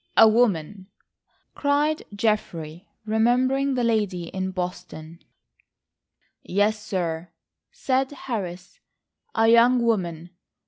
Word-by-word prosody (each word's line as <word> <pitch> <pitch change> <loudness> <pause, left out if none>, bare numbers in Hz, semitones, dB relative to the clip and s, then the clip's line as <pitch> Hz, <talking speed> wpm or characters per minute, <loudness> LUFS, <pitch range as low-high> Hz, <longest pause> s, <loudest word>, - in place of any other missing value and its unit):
"A 225 - +9
woman?" 205 -5 +1 0.7
cried 295 +2 +1
Geoffrey, 180 -5 -2 0.2
remembering 255 +5 +1
the 245 - 0
lady 205 -7 0
in 190 0 -3
Boston. 175 -3 -6 1.2
"Yes, 210 +3 0
sir," 175 -4 -3 0.4
said 270 - 0
Harris, 195 -10 -6 0.6
"a 225 0 +3
young 235 +2 +5
woman. 175 -7 -1
215 Hz, 90 wpm, -24 LUFS, 180-245 Hz, 1.2 s, A